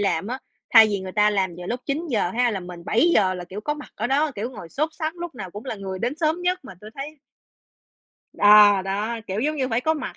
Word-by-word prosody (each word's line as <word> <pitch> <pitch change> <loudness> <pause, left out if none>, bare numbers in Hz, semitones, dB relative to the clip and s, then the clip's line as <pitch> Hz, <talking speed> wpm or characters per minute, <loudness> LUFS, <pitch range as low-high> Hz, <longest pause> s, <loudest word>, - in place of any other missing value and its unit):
làm 190 -2 0
á, 255 +3 -4 0.3
thay 225 -2 +9
vì 205 -2 -2
người 185 -1 -7
ta 210 0 +3
làm 190 -4 0
vào 175 - -7
lúc 240 +5 -3
9:00 275 - -1
ha, 245 +4 +1
là 200 -3 -3
mình 180 -1 -10
7:00 215 - +3
là 180 - -6
kiểu 190 +4 -8
có 295 +8 -2
mặt 300 - -10
ở 220 - -2
đó, 290 +4 +1
kiểu 215 +4 -4
ngồi 205 -9 -10
sốt 305 - -1
sắn 315 0 -3
lúc 345 -4 -6
nào 190 -6 -7
cũng 205 +6 -9
là 255 - -4
người 190 -2 -6
đến 240 +6 -2
sớm 320 +2 0
nhất, 360 +1 +1
mà 190 - -10
tui 215 +1 -11
thấy 295 +3 -7 1.1
Ờ, 205 -1 +7
đó, 205 +5 -2
kiểu 195 +3 -2
giống 305 +3 0
như 260 -2 -1
phải 230 -1 0
có 315 +5 +1
mặt 300 - -6
220 Hz, 255 wpm, -23 LUFS, 195-290 Hz, 1.1 s, thay